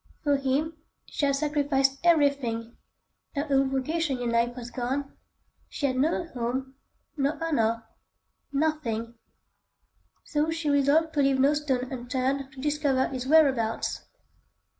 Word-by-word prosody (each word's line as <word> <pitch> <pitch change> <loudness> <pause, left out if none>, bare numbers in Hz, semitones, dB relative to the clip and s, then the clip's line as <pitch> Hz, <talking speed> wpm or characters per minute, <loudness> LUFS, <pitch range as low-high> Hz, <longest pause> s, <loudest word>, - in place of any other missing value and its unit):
For 290 -1 +3
him 280 +4 -1 0.3
she 285 - -1
had 275 - +2
sacrificed 275 -2 +1
everything: 280 -8 +2 0.6
her 285 +1 -1
old 270 0 +4
vocation 275 +2 -1
in 245 -1 -2
life 235 +1 +1
was 240 -1 -8
gone, 265 +3 -3 0.5
she 285 - -3
had 260 -2 +1
no 320 +6 +1
home, 260 +1 -3 0.4
no 280 +2 0
honour,—nothing, 235 -1 -2 1.1
so 300 +1 0
she 325 -2 -1
resolved 285 +3 +3
to 290 - +2
leave 275 -1 +3
no 275 +3 +5
stone 265 -4 -1
unturned 260 +2 -2
to 270 - -13
discover 290 -2 +1
his 260 -1 -4
whereabouts. 270 -7 +2
275 Hz, 125 wpm, -27 LUFS, 255-295 Hz, 1.1 s, no